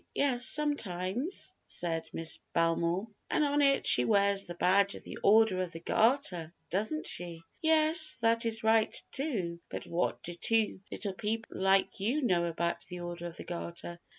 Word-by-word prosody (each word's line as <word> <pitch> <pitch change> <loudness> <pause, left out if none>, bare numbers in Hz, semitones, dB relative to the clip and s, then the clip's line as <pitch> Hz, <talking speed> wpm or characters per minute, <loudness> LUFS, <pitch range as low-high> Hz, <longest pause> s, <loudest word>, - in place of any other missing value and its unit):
"Yes, 255 -3 +2
sometimes," 255 - 0
said 165 -2 -1
Miss 165 -1 0
Belmore. 170 +4 0 0.2
"And - - +1
on 290 0 +1
it 275 -1 +2
she - - +6
wears 200 -2 +2
the 175 - -6
badge 200 +3 +2
of - - -11
the - - -9
Order 215 -2 +4
of 180 -1 -5
the 165 - -7
Garter, 185 - +1 0.2
doesn't 220 - -2
she?" 170 -2 -6 0.2
"Yes, 315 0 +5
that 230 +1 +2
is 225 -1 +2
right, 220 0 +2
too; 200 - -4
but - - -7
what 170 +1 -2
do 175 - -6
two 220 +4 0
little 200 -3 -4
people 220 +3 -4
like 195 +1 +2
you 250 +10 -1
know 175 -7 +1
about 170 0 -3
the 180 0 -8
Order 175 0 -6
of 170 - -10
the - - -8
Garter?" 170 0 -7
200 Hz, 170 wpm, -30 LUFS, 175-240 Hz, 0.2 s, she